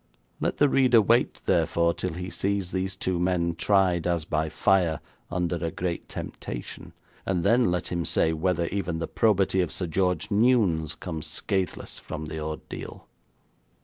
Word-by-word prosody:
Let - - -1
the 145 - +5
reader 130 -4 +5
wait, 115 +3 +2
therefore, 85 0 +2
till 90 -1 -3
he 90 +2 -5
sees 100 -2 -1
these 95 0 -2
two 95 -2 -1
men 90 -1 +1
tried 90 -1 +2
as 85 -3 0
by 80 0 -1
fire 85 -1 +2 0.3
under 90 -1 -1
a 85 0 -2
great 85 +1 -4
temptation, - - -7 0.3
and 90 -3 -1
then 115 +1 +4
let 90 0 -1
him 85 -1 -1
say 80 0 +2
whether 85 +1 0
even 90 -4 -2
the 80 0 -3
probity 100 -4 +2
of 90 - -1
Sir 90 - -2
George 90 +3 0
Newnes 100 -9 +3
comes 80 -3 -5
scathless 95 +4 -3
from 80 0 -6
the 80 +1 -5
ordeal. 75 0 -7
90 Hz, 160 wpm, -26 LUFS, 80-95 Hz, 0.3 s, the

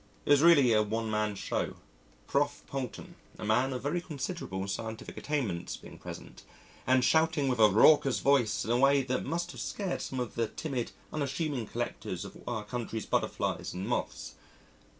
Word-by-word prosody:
It - - +1
was 145 -1 +7
really 145 -8 +7
a 110 - +5
one 110 +1 -2
man 105 -1 0
show, - - -2 0.5
Prof. 145 +1 0
Poulton, 130 -6 -5 0.2
a - - -6
man 125 +5 +2
of 125 -1 -4
very 160 +5 0
considerable 140 - -4
scientific 110 +3 -5
attainments, 115 - -2
being - - -13
present, - - -9 0.5
and 130 -1 +4
shouting 160 -1 +3
with 125 -3 0
a 110 -1 +8
raucous 135 +5 +6
voice 135 -6 +2
in 115 - -1
a 120 - +3
way 140 +1 +5
that 130 0 -1
must 170 +4 -2
have - - -7
scared 195 -3 -3
some 130 - -4
of 125 -2 -3
the 115 -1 0
timid, 130 -4 -4 0.2
unassuming 140 -4 -2
collectors - - -4
of - - -10
our 110 -3 -2
country's 115 -1 -4
butterflies - - -1
and 95 +2 -4
moths. - - -3
130 Hz, 170 wpm, -30 LUFS, 110-145 Hz, 0.5 s, a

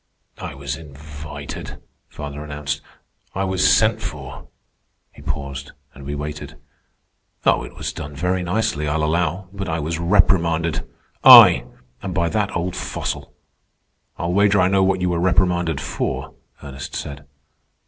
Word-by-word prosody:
"I - - -6
was 70 0 -4
invited," 75 -1 -9 0.3
father 75 0 -7
announced. 75 -1 -4 0.5
"I 95 - 0
was 95 -1 +3
sent 110 0 +3
for." - - -7 0.6
He - - -15
paused, 70 0 -5 0.2
and 70 +1 -12
we 70 - -3
waited. 75 0 -6 0.9
"Oh, - - +4
it - - -10
was - - -4
done 75 0 -7
very 90 +4 0
nicely, 90 -5 -1
I'll 75 +1 0
allow; 85 +4 0
but 100 -2 -4
I 80 - -1
was 80 +1 -3
reprimanded. 85 -3 +2 0.3
I! - - +10 0.4
And 95 -3 -5
by 85 -3 +1
that 105 +4 -1
old 90 +1 -2
fossil!" 90 - -4 0.9
"I'll 85 +1 -2
wager 100 +1 +4
I 90 0 +4
know 95 0 +3
what 95 -1 +1
you 90 - +1
were 85 -1 0
reprimanded 90 -3 +2
for," 70 - -3 0.3
Ernest 70 -2 -7
said. 70 0 -6
80 Hz, 145 wpm, -21 LUFS, 75-90 Hz, 0.9 s, I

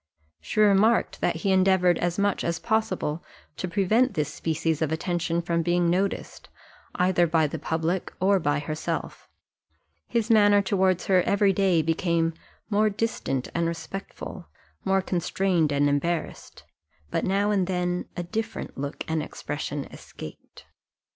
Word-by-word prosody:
She - - -4
remarked 210 +3 +3
that - - +1
he 195 - 0
endeavoured 185 -2 +4
as 175 0 -1
much 200 -1 +1
as 170 -1 -1
possible 185 -7 -1 0.3
to 185 - -3
prevent 205 +6 +2
this 150 -3 -1
species 160 -1 -1
of 160 -1 0
attention 170 0 -1
from 170 -1 0
being 175 0 +2
noticed, 190 +2 -2 0.5
either 180 -1 +3
by 160 -1 +3
the 145 - -4
public 165 +3 -1
or 195 +1 +3
by 145 -3 +1
herself; 155 +1 -4 0.8
his 230 -1 0
manner 205 -2 +6
towards 190 -2 +1
her 185 -2 +4
every 200 +1 +2
day 185 -4 +2
became 165 0 +1 0.4
more 210 +1 +3
distant 200 - -2
and 170 0 0
respectful, 180 +1 -7 0.4
more 190 0 +2
constrained 180 -3 0
and 145 0 +2
embarrassed; 155 +4 -2 0.5
but - - 0
now 200 +2 +1
and 190 -3 +1
then 180 -1 -1
a 175 - -2
different 220 -4 -5
look 140 +2 -4
and 160 -1 0
expression 145 -1 -5
escaped. 75 - -11
180 Hz, 140 wpm, -26 LUFS, 165-195 Hz, 0.8 s, manner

